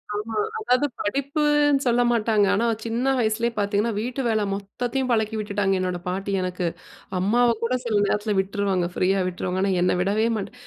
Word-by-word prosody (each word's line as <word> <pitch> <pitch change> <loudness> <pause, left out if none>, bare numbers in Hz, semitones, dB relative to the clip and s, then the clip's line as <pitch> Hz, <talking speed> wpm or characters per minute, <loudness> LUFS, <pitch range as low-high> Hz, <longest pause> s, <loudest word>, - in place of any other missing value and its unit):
ஆமா, 215 +2 -4 0.2
அதாவது 290 -9 +2
படிப்புன்னு 290 +3 +1
சொல்ல 245 0 +3
மாட்டாங்க. 220 -3 +2
ஆனா 215 +4 +1 0.2
சின்ன 240 +4 0
வயசுலயே 230 +1 +1
பார்த்தீங்கன்னா, 205 +2 0
வீட்டு 250 +4 -3
வேல 220 -2 +1
மொத்தத்தையும் 245 +6 -3
பழக்கி 220 -1 +1
விட்டுட்டாங்க, 205 -2 0
என்னோட 180 -1 -2
பாட்டி 195 +2 -3
எனக்கு. 180 -1 -2 0.5
அம்மாவ 235 +5 +3
கூட 230 +2 0
சில 225 -3 0
நேரத்தில 210 +1 0
விட்டுருவாங்க, 195 -2 0
ஃப்ரீயா 190 +2 +1
விட்டுருவாங்க. 185 +1 -2
ஆனா 195 - +1
என்ன 180 - +2
விடவே 210 +4 +1
மாட்ட. 195 - -5
215 Hz, 160 wpm, -24 LUFS, 195-240 Hz, 0.5 s, சொல்ல